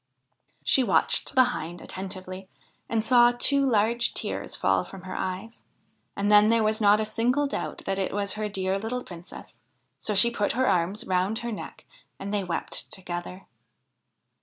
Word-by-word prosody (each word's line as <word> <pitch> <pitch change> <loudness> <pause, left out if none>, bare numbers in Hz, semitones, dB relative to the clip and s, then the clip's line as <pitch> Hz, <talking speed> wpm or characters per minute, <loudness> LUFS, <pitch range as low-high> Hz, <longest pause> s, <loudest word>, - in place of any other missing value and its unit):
She 265 - +4
watched 265 - +2
the 260 - +7
Hind 170 +2 -6
attentively 185 0 -7 0.4
and 225 -1 0
saw 240 -2 +6
two 280 +3 +3
large 230 +1 +1
tears - - -3
fall - - +1
from 190 -2 -11
her 185 - -7
eyes, 190 +5 -5 0.5
and 200 +1 0
then 210 0 +7
there 230 -1 +3
was 215 +1 0
not 205 0 +5
a 215 - 0
single 240 +6 +1
doubt 275 - -4
that 195 0 -1
it 190 - -1
was 200 -1 -1
her 215 0 -3
dear 190 -1 -1
little 245 +4 -4
Princess; 175 0 -11 0.5
so 210 - -1
she 235 +4 +6
put 210 -3 -1
her 260 +2 +1
arms 185 +2 +1
around 185 +4 0
her 235 - -2
neck, 210 - -8 0.3
and 200 +1 -5
they 205 -1 0
wept 170 -3 -3
together. 180 0 -6
205 Hz, 170 wpm, -26 LUFS, 190-230 Hz, 0.5 s, the